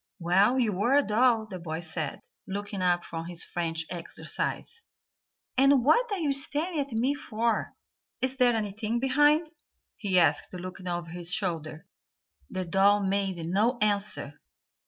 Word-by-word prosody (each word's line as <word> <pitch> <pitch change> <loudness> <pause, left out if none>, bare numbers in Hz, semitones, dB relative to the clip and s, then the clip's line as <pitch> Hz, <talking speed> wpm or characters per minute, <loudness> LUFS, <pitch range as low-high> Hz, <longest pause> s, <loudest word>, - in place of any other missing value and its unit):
"Well, 195 +7 +3
you 210 -7 0
are 245 +6 +3
a 290 - +4
doll," 225 0 +3
the 190 -4 -8
boy 165 -1 -5
said, 160 -3 -3 0.3
looking 200 0 -4
up 175 -1 +2
from 165 0 -6
his 175 -1 -3
French 165 -2 -3
exercise. 180 - -4 0.8
"And 275 -2 +5
what 475 - +4
are 405 - 0
you 310 -5 0
staring 295 +5 0
at 280 -1 -2
me 245 +5 +1
for 235 -4 -2 0.4
is 260 +1 -1
there 245 -2 +4
anything 215 +2 -2
behind?" 295 +5 +3 0.5
he 195 -5 0
asked, 165 +1 +2
looking 185 +1 -7
over 175 -1 -3
his 175 0 -5
shoulder. 160 -5 -3 0.6
The 185 - -3
doll 200 +4 +4
made 190 -3 -1
no 210 +8 +1
answer. 205 -8 -1
205 Hz, 150 wpm, -28 LUFS, 175-255 Hz, 0.8 s, And